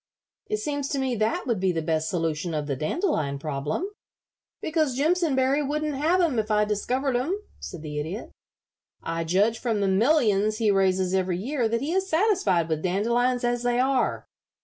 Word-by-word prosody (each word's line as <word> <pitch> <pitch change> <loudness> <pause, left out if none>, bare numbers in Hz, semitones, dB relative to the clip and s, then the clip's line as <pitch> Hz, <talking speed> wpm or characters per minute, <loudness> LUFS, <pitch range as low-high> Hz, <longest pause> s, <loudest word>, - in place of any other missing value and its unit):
"It 425 - -1
seems 285 -7 -2
to 280 - -2
me 265 -2 0
that 215 +1 0
would 235 -6 0
be 190 0 +2
the 165 -2 -2
best 160 0 0
solution 165 -1 -2
of 150 -1 -2
the 140 -2 -2
dandelion 155 - -1
problem." 145 - -3 0.7
"Because 310 -5 0
Jimpsonberry 290 -3 +2
wouldn't 300 +1 -1
have 315 +7 +2
'em 315 -10 +2
if 215 0 -2
I 210 0 +3
discovered 250 +6 -1
'em," 315 +12 0 0.2
said 175 -4 -8
the 150 -1 -4
Idiot. 170 +10 -5 0.7
"I 165 0 -2
judge 200 +7 +2
from 230 -4 -1
the 200 - +1
millions 215 -1 +3
he 220 -2 +2
raises 190 -1 +2
every 185 -2 +1
year 240 +3 -1
that 230 +1 0
he 300 +5 -2
is 380 0 0
satisfied 320 - +2
with 160 -2 -1
dandelions 235 +7 +1
as 240 0 0
they 245 0 +1
are. 260 0 +1
225 Hz, 180 wpm, -26 LUFS, 180-280 Hz, 0.7 s, I